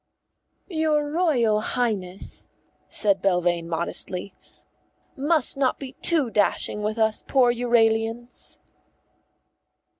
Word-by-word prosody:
"Your 310 -4 -1
Royal 250 -11 +1
Highness," 205 -6 -3 0.4
said 200 -3 +3
Belvane 175 -3 0
modestly, 180 +3 0 0.8
"must 290 -1 +3
not 265 -2 0
be 270 -2 -8
too 305 -9 +1
dashing 210 0 +2
with 215 +2 -3
us 220 -1 0
poor 250 -3 +3
Euralians." 230 0 -1
230 Hz, 90 wpm, -23 LUFS, 200-275 Hz, 0.8 s, said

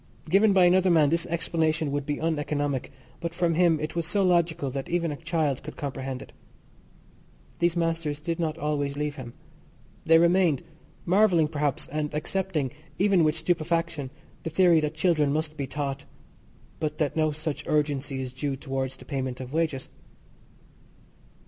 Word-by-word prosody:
Given 200 +6 +5
by 190 -2 +5
another 185 +1 +4
man 155 -4 +5
this 170 0 +1
explanation 160 -2 0
would 145 0 -2
be 145 -1 -1
uneconomic, 145 -4 -1 0.3
but 170 0 -4
from 170 -1 +1
him 165 -2 +3
it 155 +2 -4
was 170 -2 -1
so 200 +3 +2
logical 170 -5 +2
that 135 0 -5
even 170 -2 0
a - - -3
child 160 -4 -1
could 150 +2 -9
comprehend 135 -2 -4
it. - - -17 1.3
These 170 0 +2
masters 165 -3 -1
did 165 +2 -3
not 160 -2 -1
always 145 -2 -1
leave 150 0 -2
him. 120 -2 -8 0.7
They 165 0 +7
remained, 170 -3 +3 0.4
marvelling 180 -4 +4
perhaps, 145 -3 -1
and 150 0 -3
accepting, 160 -3 -1 0.3
even 195 -3 +4
with 155 0 +2
stupefaction, 165 -3 -1 0.3
the - - -4
theory 170 0 +5
that 155 0 -2
children 155 -4 +2
must 155 +1 -1
be 140 -2 -3
taught, 140 0 -4 0.7
but 155 -1 -2
that 150 -3 0
no 155 -1 +2
such 155 0 -4
urgency 145 -3 0
is 125 -1 -7
due 135 +1 -2
towards 135 -1 -3
the - - -14
payment 130 -3 -3
of 130 +1 -7
wages. 155 -5 -1
155 Hz, 160 wpm, -27 LUFS, 145-170 Hz, 1.3 s, They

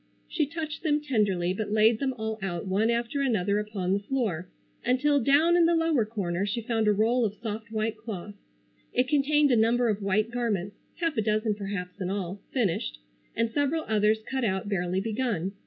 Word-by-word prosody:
She 305 -4 0
touched 310 -1 -5
them 300 -2 +2
tenderly, 205 -11 +1
but 205 +1 -4
laid 220 +1 +4
them 265 -2 -1
all 220 0 -3
out 175 -3 -3
one 200 +4 +1
after 235 +4 0
another 210 -6 +1
upon 200 -3 -2
the 200 - +2
floor 200 -6 -2 0.3
until 280 +4 +3
down 285 +7 +4
in 340 -1 +5
the 340 - +3
lower 325 -8 +2
corner 195 -5 -2
she 205 +4 -1
found 225 -1 0
a - - +6
roll 225 +4 +2
of 210 -2 -1
soft 220 0 -6
white 220 0 -1
cloth. 210 -3 -7 0.6
It 250 +1 +2
contained 295 0 +3
a - - +5
number 235 +2 +3
of 210 -1 -1
white 210 +3 +1
garments, 210 -6 -2 0.2
half 330 -5 -1
a - - +3
dozen 215 0 +1
perhaps 200 -2 -5
in 185 - -1
all, 195 0 -4
finished, 170 - -1 0.4
and 230 0 0
several 290 +4 0
others 215 0 +2
cut 265 -1 -2
out 190 -2 -1
barely 185 -2 0
begun. 210 -4 -1
220 Hz, 190 wpm, -27 LUFS, 200-255 Hz, 0.6 s, a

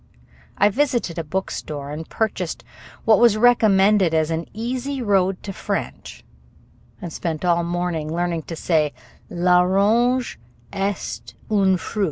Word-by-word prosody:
I 205 - +4
visited 240 - -1
a - - -2
bookstore 150 -4 -4
and 155 +2 -7
purchased 190 -6 -2 0.4
what 225 - +5
was 235 -3 +5
recommended 205 -6 +4
as 160 0 +1
an 165 +1 -3
easy 255 +5 -4
road 195 -5 +1
to 195 - -6
French, - - -5 0.8
and 170 -3 -7
spent 165 -1 -3
all 170 -1 +3
morning 170 -3 -2
learning 170 0 -1
to 165 - -4
say, 155 -3 +1 0.4
"l'orange 195 - +2 0.3
est 195 - -4 0.2
un 195 -3 +3
fruit." 210 - -7
185 Hz, 130 wpm, -22 LUFS, 165-215 Hz, 0.8 s, what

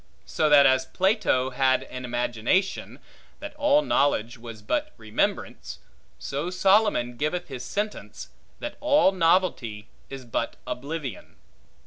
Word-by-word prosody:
So 155 - 0
that 145 -1 +7
as 130 0 +3
Plato 180 -8 +1
had 130 0 +2
an 125 0 -8
imagination, 120 - -1 0.4
That 300 - -8
all 295 0 +3
knowledge 120 - +1
was 115 -3 -11
but 300 - -2
remembrance; 110 0 -3 0.4
so 145 +5 -4
Solomon 190 - +2
giveth 175 +5 -2
his 130 -2 -6
sentence, 210 +10 -5 0.3
That 295 - -6
all 290 -8 +4
novelty 165 - 0 0.2
is 135 -2 -8
but 115 - -3
oblivion. 140 - -6
145 Hz, 120 wpm, -25 LUFS, 125-190 Hz, 0.4 s, that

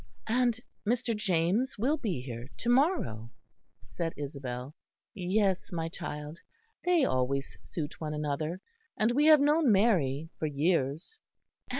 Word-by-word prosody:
"And 240 +1 +2 0.2
Mr. 235 +1 0
James 205 +5 +1
will 260 +9 +2
be 200 - -2
here 120 0 -7
to 235 - -2
morrow?" 245 - +2 0.6
said 165 -1 -3
Isabel. 135 -2 -5 0.4
"Yes, 190 0 0
my 165 -2 -2
child. 150 0 -6 0.4
They 350 -5 +4
always 130 +2 -1
suit 155 -1 -6
one 150 -1 -3
another; 150 +4 -2 0.4
and 215 +2 +3
we 290 +5 +3
have 310 -1 +9
known 295 -2 +4
Mary 165 - +2
for 155 - 0
years." 155 - 0
175 Hz, 125 wpm, -30 LUFS, 145-235 Hz, 0.6 s, have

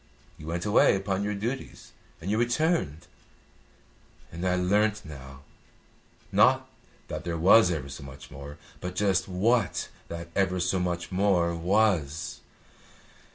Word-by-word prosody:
You 75 - -10
went 85 +1 -3
away 105 - +5
upon 95 0 -1
your 105 0 -1
duties 120 +7 -5 0.3
and 90 +5 -4
you 110 - +1
returned; 120 - 0 1.3
and 85 +2 -6
I 90 - +2
learnt 105 +3 +1
now, 70 -3 -10 0.9
not - - +4 0.4
that - - -5
there 85 -1 -3
was 95 +4 +6
ever 75 -6 -2
so 70 +2 -8
much 70 +1 -11
more, 70 +1 -9 0.2
but 90 0 -5
just 95 -2 +1
what 100 +4 +1 0.2
that 85 0 -7
ever 95 -2 +1
so 90 +1 +1
much 85 0 -2
more 90 -3 +2
was. 85 -4 +1
90 Hz, 135 wpm, -27 LUFS, 85-100 Hz, 1.3 s, was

